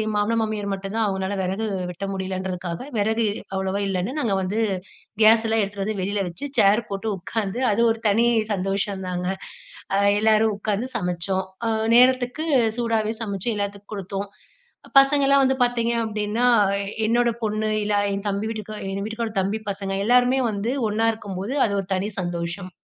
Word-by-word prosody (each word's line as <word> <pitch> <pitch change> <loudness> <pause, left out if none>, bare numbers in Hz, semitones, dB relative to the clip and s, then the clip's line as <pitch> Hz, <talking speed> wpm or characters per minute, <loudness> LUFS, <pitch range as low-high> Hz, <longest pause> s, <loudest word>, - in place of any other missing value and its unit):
மாமனார் 210 +2 +1
மாமியார் 215 -2 -2
மட்டும் 195 +1 -5
தான், 225 -1 +2
அவங்கனால 190 0 -2
வெறகு 190 +4 -2 0.3
வெட்ட 180 +3 -5
முடியலன்றதுக்காக, 185 -2 -4 0.2
வெறகு 220 +2 +1 0.3
அவ்ளவா 190 +1 -1
இல்லன்னு 190 +3 -1
நாங்க 230 -8 0
வந்து 195 +4 -1 0.6
கேஸ்லாம் 225 0 +5
எடுத்துட்டு 200 0 -3
வந்து 215 0 -2
வெளில 200 +2 -1
வச்சு, 225 +12 -6
சேர் 210 +3 +4
போட்டு 200 +2 -3
உக்காந்து, 210 +4 -3
அது 210 +3 +1
ஒரு 225 - -3
தனி 225 +3 +3 0.3
சந்தோஷந்தாங்க! 190 -2 -2 0.7
அ, - - +3 0.2
எல்லாரும் 220 0 +3
உக்காந்து 215 +4 -2
சமச்சோம். 180 +1 -1 0.2
அ, - - +1 0.3
நேரத்துக்கு 255 +4 +3 0.3
சூடாவே 225 -2 0
சமச்சு, 200 0 -3
எல்லாத்துக்கும் 200 0 -5
குடுத்தோம். 195 0 -4 0.7
பசங்கலாம் 275 0 +4
வந்து 265 0 +2
பாத்தீங்க 235 -1 0
அப்டின்னா, 215 +2 -1 0.3
அ - - -1 0.3
என்னோட 240 +1 +3
பொண்ணு 215 0 -1
இல்ல, 205 0 0 0.2
என் 200 +1 -5
தம்பி 200 +2 -2
வீட்டுக்கா 215 -1 -6
எங்க 195 +1 -3
வீட்டுக்காரோட 220 0 -4
தம்பி 205 +4 -2
பசங்க 195 0 -4
எல்லாருமே 250 +2 +4
வந்து 210 +4 -2 0.2
ஒண்ணா 220 +2 +1
இருக்கும்போது 200 +2 -5
அது 205 - -3
ஒரு 185 - -15
தனி 195 +3 -2
சந்தோஷம். 175 +2 -4
205 Hz, 150 wpm, -23 LUFS, 195-225 Hz, 0.7 s, கேஸ்லாம்